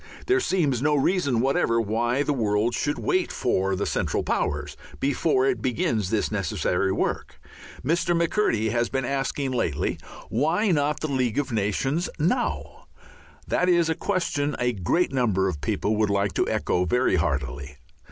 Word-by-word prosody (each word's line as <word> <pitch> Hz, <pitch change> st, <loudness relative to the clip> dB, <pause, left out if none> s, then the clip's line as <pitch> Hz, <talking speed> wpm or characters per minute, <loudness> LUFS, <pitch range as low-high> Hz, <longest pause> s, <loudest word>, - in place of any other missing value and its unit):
There 385 Hz, 0 st, +3 dB
seems 155 Hz, -, 0 dB
no 150 Hz, +1 st, +2 dB
reason 140 Hz, -5 st, +1 dB
whatever 125 Hz, -3 st, +2 dB
why 120 Hz, +5 st, 0 dB
the 145 Hz, -, 0 dB
world 110 Hz, -1 st, +1 dB
should 145 Hz, +4 st, -1 dB
wait 370 Hz, -1 st, 0 dB
for 95 Hz, -5 st, 0 dB
the 100 Hz, -, -2 dB
Central -, -, -1 dB
Powers 75 Hz, -1 st, -2 dB, 0.2 s
before 140 Hz, -1 st, +1 dB
it 130 Hz, -5 st, 0 dB
begins 125 Hz, -, 0 dB
this 110 Hz, -1 st, 0 dB
necessary 100 Hz, -6 st, 0 dB
work. -, -, -2 dB, 0.5 s
Mr. 170 Hz, +3 st, +1 dB
McCurdy 165 Hz, -, +1 dB
has 120 Hz, +1 st, 0 dB
been 135 Hz, -1 st, -1 dB
asking 135 Hz, +1 st, -2 dB
lately, 80 Hz, -, -1 dB, 0.3 s
"Why 160 Hz, -, +1 dB
not 150 Hz, -2 st, +1 dB
the 155 Hz, -, -1 dB
League 130 Hz, -5 st, -1 dB
of 145 Hz, -3 st, -1 dB
Nations 115 Hz, -, 0 dB
now?" 185 Hz, +11 st, -2 dB, 0.6 s
That 180 Hz, -, +1 dB
is 170 Hz, -2 st, +3 dB
a -, -, +3 dB
question 150 Hz, -7 st, -1 dB
a 125 Hz, 0 st, 0 dB
great 115 Hz, -, 0 dB
number 105 Hz, -7 st, +1 dB
of 80 Hz, -6 st, -4 dB
people 105 Hz, +8 st, 0 dB
would 105 Hz, -1 st, +2 dB
like 100 Hz, -2 st, 0 dB
to -, -, 0 dB
echo 90 Hz, -, 0 dB
very 125 Hz, +2 st, +2 dB
heartily. 70 Hz, -2 st, -2 dB
125 Hz, 160 wpm, -25 LUFS, 105-150 Hz, 0.6 s, There